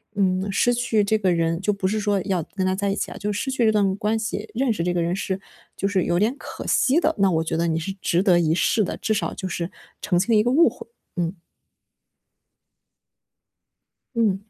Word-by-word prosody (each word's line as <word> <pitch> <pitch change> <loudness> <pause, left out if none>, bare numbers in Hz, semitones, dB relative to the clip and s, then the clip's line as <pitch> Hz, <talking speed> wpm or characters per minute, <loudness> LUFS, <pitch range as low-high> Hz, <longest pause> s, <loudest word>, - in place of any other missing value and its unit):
嗯， 190 0 +1
失 245 +5 +2
去 230 -3 +1
这 220 +2 +2
个 190 -4 +1
人 165 0 0
就 210 - +1
不 195 -1 -1
是 215 +2 0
说 205 -2 +1
要 185 -4 0
跟 190 -1 0
他 185 0 +1
在 200 +1 -1
一 195 - -1
起 - - -3
啊， - - -8
就 210 0 -2
失 250 +6 -2
去 255 -3 +1
这 220 - +5
段 200 -3 +2
关 210 +2 0
系， 215 -1 -4
认 250 +1 +1
识 170 - -2
这 180 - 0
个 175 - 0
人 170 +2 0
是 195 -1 -3 0.4
就 195 - 0
是 195 -3 +1
有 175 - +1
点 225 +7 +1
可 - - -8
惜 275 +6 +3
的， 320 -1 +1
那 195 -1 +4
我 160 -1 +1
觉 160 - -2
得 170 - +1
你 165 0 0
是 165 +4 -4
值 175 +3 +1
得 180 -4 +4
一 160 -2 +2
试 215 +4 +2
的， - - -4
至 220 - 0
少 215 - -1
就 190 - -5
是 175 -1 -3 0.3
澄 180 -4 +1
清 220 +5 +2
一 210 - +5
个 240 - +1
误 330 +6 +5
会。 - - -12 0.3
嗯。 175 +1 -2 2.8
嗯。 210 -3 0
200 Hz, 250 characters per minute, -23 LUFS, 180-220 Hz, 2.8 s, 这